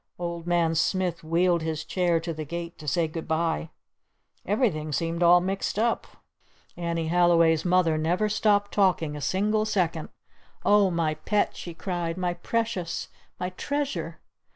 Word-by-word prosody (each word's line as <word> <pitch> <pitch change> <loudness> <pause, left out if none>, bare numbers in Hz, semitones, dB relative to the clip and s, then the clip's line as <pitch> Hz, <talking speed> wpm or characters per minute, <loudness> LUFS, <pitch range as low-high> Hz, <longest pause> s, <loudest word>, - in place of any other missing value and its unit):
Old 170 -1 -5
Man 170 -2 +2
Smith 175 +1 0
wheeled 170 +2 +2
his 160 -1 -3
chair 175 -3 +1
to 165 0 -4
the 155 0 -5
gate 170 +2 -6
to 150 - -10
say 160 +4 +1
"Good 160 +1 -6
bye." 160 - 0 0.8
Everything 190 - 0
seemed 165 +3 -2
all 175 +1 +7
mixed 195 +2 -2
up. 230 +2 0 0.7
Annie 170 -2 -2
Halliway's 170 -2 +4
Mother 175 -3 +2
never 175 +7 +1
stopped 205 -1 +2
talking 180 -6 +2
a 150 - -6
single 210 +8 +1
second. 180 -7 -1 0.6
"Oh, 205 -2 +5
my 165 -3 0
Pet!" 205 +7 0
she 170 -2 -8
cried. 175 -2 -3
"My 180 -1 -1
Precious. 195 -1 -2 0.3
My 180 0 -3
Treasure!" 285 +8 -3
175 Hz, 150 wpm, -26 LUFS, 165-190 Hz, 0.8 s, all